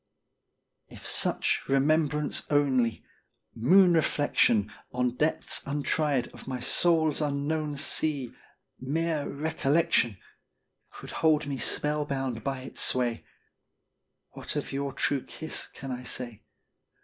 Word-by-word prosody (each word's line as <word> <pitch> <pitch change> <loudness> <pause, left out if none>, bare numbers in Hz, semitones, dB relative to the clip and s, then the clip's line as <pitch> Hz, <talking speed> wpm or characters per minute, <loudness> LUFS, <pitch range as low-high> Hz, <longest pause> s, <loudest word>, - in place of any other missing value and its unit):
If - - -12
such - - +1
remembrance 150 +2 +1
only 130 -6 +2 0.5
moon 180 +10 +5
reflection 145 -9 +2 0.2
On 125 -1 0
depths 155 +4 0
untried 145 -2 0
of - - -12
my 130 -1 -3
soul's 160 +4 +2
unknown 150 +1 -1
sea 140 -4 0 0.5
Mere 155 +3 -1
recollection 155 - +1 0.7
Could - - -11
hold 155 -2 +2
me 140 -2 -4
spellbound 135 -4 -1
by 135 -1 -2
its 130 - -7
sway, 120 -2 0 1.1
What - - -6
of - - -3
your 140 0 -2
true 140 +1 0
kiss 160 - -3
can 135 -1 -8
I 125 0 -4
say? 120 -3 -4
140 Hz, 110 wpm, -28 LUFS, 130-155 Hz, 1.1 s, moon